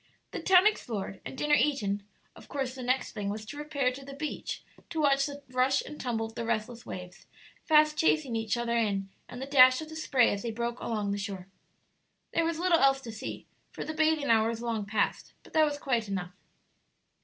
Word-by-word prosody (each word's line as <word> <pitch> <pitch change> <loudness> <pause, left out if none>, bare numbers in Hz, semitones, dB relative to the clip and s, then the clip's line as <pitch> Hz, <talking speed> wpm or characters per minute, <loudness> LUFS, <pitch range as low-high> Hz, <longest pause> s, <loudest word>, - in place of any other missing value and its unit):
The - - -4
town 375 0 +6
explored 220 - -1
and - - -8
dinner 295 +2 +1
eaten, 210 -10 +2 0.3
of - - -14
course 265 -3 -3
the 260 - -8
next 255 +2 0
thing 205 -3 -3
was 215 +1 -4
to 265 - -8
repair 290 -3 -1
to 270 +2 -9
the 275 0 -9
beach 300 +1 -4 0.3
to 325 - -3
watch 275 -2 +3
the 285 0 -8
rush 255 +2 +2
and 300 - -8
tumble 230 -3 -1
of 225 - -9
the 235 - -4
restless 230 +1 -3
waves, 180 0 -8 0.4
fast 305 -1 +5
chasing 305 -6 +2
each 225 0 -1
other 235 0 -1
in, 200 -4 0 0.2
and 245 - -8
the 265 - -4
dash 255 -2 +7
of 315 - -7
the 315 - -9
spray 270 -6 +3
as 200 - -4
they 235 - -3
broke 235 +2 -3
along 210 -3 -2
the 200 - -2
shore. 195 -2 -6 0.8
There 335 - +2
was 335 -1 -1
little 345 -1 +3
else 270 0 +4
to 235 - -7
see, 220 - -7 0.2
for - - -6
the 310 - -4
bathing 310 -3 +2
hour 220 -1 +4
was 230 0 -4
long 225 -4 -2
past; 215 0 -1
but - - -17
that 315 -1 +5
was 295 -1 -2
quite 240 -6 -1
enough. 180 -2 -4
255 Hz, 215 wpm, -29 LUFS, 220-295 Hz, 0.8 s, dash